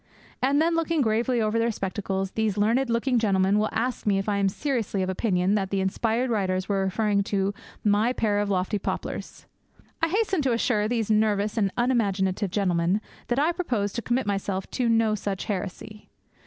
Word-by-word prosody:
And 275 Hz, +3 st, +3 dB
then, 330 Hz, +2 st, +2 dB
looking 330 Hz, -1 st, +1 dB
gravely 235 Hz, +1 st, +1 dB
over 215 Hz, +1 st, +1 dB
their 230 Hz, +1 st, +2 dB
spectacles, 195 Hz, -1 st, -3 dB
these 220 Hz, -3 st, -1 dB
learned 235 Hz, +5 st, +2 dB
looking 235 Hz, +2 st, +1 dB
gentlemen 195 Hz, -1 st, +2 dB
will 215 Hz, -, +1 dB
ask 245 Hz, 0 st, -2 dB
me 200 Hz, -1 st, +3 dB
if 195 Hz, -, -2 dB
I 205 Hz, -1 st, +1 dB
am 195 Hz, -1 st, +3 dB
seriously 225 Hz, -5 st, -2 dB
of 185 Hz, -, -1 dB
opinion 190 Hz, -1 st, +1 dB
that 195 Hz, -2 st, 0 dB
the 195 Hz, -, 0 dB
inspired 225 Hz, +6 st, 0 dB
writers 185 Hz, -3 st, 0 dB
were 195 Hz, -1 st, +1 dB
referring 205 Hz, +1 st, +1 dB
to 200 Hz, 0 st, 0 dB, 0.3 s
my 210 Hz, +3 st, +3 dB
pair 210 Hz, -4 st, 0 dB
of 205 Hz, -1 st, -1 dB
lofty 190 Hz, +2 st, 0 dB
poplars. -, -, -5 dB, 0.6 s
I 325 Hz, -, +3 dB
hasten 390 Hz, -1 st, +1 dB
to 265 Hz, -4 st, +1 dB
assure 225 Hz, -2 st, +1 dB
these 225 Hz, -2 st, -1 dB
nervous 210 Hz, -1 st, +2 dB
and 200 Hz, -4 st, +1 dB
unimaginative 205 Hz, -5 st, +1 dB
gentlemen 180 Hz, -1 st, +1 dB, 0.3 s
that 240 Hz, -, 0 dB
I 300 Hz, +4 st, +3 dB
propose 240 Hz, -, -2 dB
to 235 Hz, -, -3 dB
commit 240 Hz, +2 st, 0 dB
myself 195 Hz, -1 st, -2 dB
to 245 Hz, -3 st, 0 dB
no 225 Hz, -1 st, +3 dB
such 200 Hz, -2 st, -3 dB
heresy. 205 Hz, +2 st, -5 dB
210 Hz, 185 wpm, -26 LUFS, 195-240 Hz, 0.6 s, And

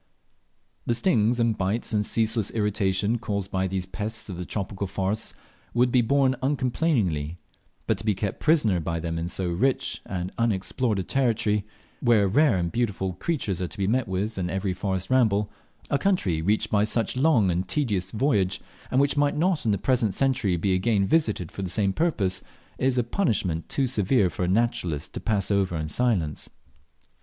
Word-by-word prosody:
The 120 Hz, -, +2 dB
stings 120 Hz, -, +2 dB
and 115 Hz, -2 st, +2 dB
bites 105 Hz, +5 st, -2 dB
and 105 Hz, -1 st, +2 dB
ceaseless 110 Hz, -1 st, +1 dB
irritation 105 Hz, 0 st, 0 dB
caused 100 Hz, -3 st, -3 dB
by 95 Hz, -1 st, 0 dB
these 95 Hz, -1 st, -2 dB
pests 105 Hz, +4 st, -5 dB
of 90 Hz, -2 st, -6 dB
the 90 Hz, -, -4 dB
tropical 100 Hz, 0 st, -4 dB
forests, 100 Hz, +3 st, -2 dB, 0.4 s
would 125 Hz, +1 st, +3 dB
be 125 Hz, -, +4 dB
borne 130 Hz, +2 st, +2 dB
uncomplainingly; 125 Hz, -, 0 dB, 0.5 s
but -, -, 0 dB
to -, -, -6 dB
be 105 Hz, -2 st, +1 dB
kept 100 Hz, 0 st, -3 dB
prisoner 120 Hz, -, +3 dB
by 85 Hz, +1 st, -2 dB
them 80 Hz, 0 st, -3 dB
in 85 Hz, -, -2 dB
so 90 Hz, 0 st, -2 dB
rich 130 Hz, +10 st, 0 dB
and 90 Hz, 0 st, -4 dB
unexplored 115 Hz, +1 st, 0 dB
a 95 Hz, -, -1 dB
country 105 Hz, -4 st, 0 dB, 0.3 s
where 115 Hz, -5 st, +4 dB
rare 130 Hz, +1 st, +3 dB
and 85 Hz, -1 st, -1 dB
beautiful 100 Hz, -5 st, -1 dB
creatures 105 Hz, -, -2 dB
are 90 Hz, -, -1 dB
to 110 Hz, -, -12 dB
be 100 Hz, -, 0 dB
met 120 Hz, +4 st, +1 dB
with 95 Hz, +3 st, -2 dB
in 90 Hz, -1 st, -2 dB
every 95 Hz, +1 st, -1 dB
forest 95 Hz, +2 st, -3 dB
ramble 105 Hz, -5 st, +3 dB, 0.4 s
a 140 Hz, -, +2 dB
country 100 Hz, -, +1 dB
reached 105 Hz, +5 st, 0 dB
by 105 Hz, -1 st, +3 dB
such 110 Hz, +1 st, 0 dB
a 130 Hz, -, -1 dB
long 125 Hz, -, +4 dB
and 90 Hz, +2 st, -1 dB
tedious 105 Hz, -11 st, -1 dB
voyage, 100 Hz, -6 st, +1 dB, 0.3 s
and 130 Hz, -, +2 dB
which 140 Hz, +1 st, +2 dB
might 145 Hz, 0 st, +2 dB
not 170 Hz, -3 st, +1 dB
in -, -, +4 dB
the 100 Hz, -, +1 dB
present 110 Hz, -2 st, +1 dB
century 130 Hz, -9 st, +1 dB
be 95 Hz, +3 st, +1 dB
again 100 Hz, +1 st, +2 dB
visited 110 Hz, -, +1 dB
for -, -, -6 dB
the 95 Hz, -, -3 dB
same 100 Hz, +1 st, +1 dB
purpose 100 Hz, -, 0 dB, 0.4 s
is 130 Hz, 0 st, +1 dB
a 125 Hz, -, +3 dB
punishment 110 Hz, -, -1 dB
too 135 Hz, -, +1 dB
severe 105 Hz, -4 st, +2 dB
for -, -, -3 dB
a -, -, -1 dB
naturalist 90 Hz, -7 st, 0 dB
to -, -, -4 dB
pass 105 Hz, -2 st, -1 dB
over 95 Hz, -4 st, +1 dB
in 80 Hz, 0 st, -3 dB
silence. 85 Hz, -, 0 dB
105 Hz, 185 wpm, -25 LUFS, 95-120 Hz, 0.5 s, be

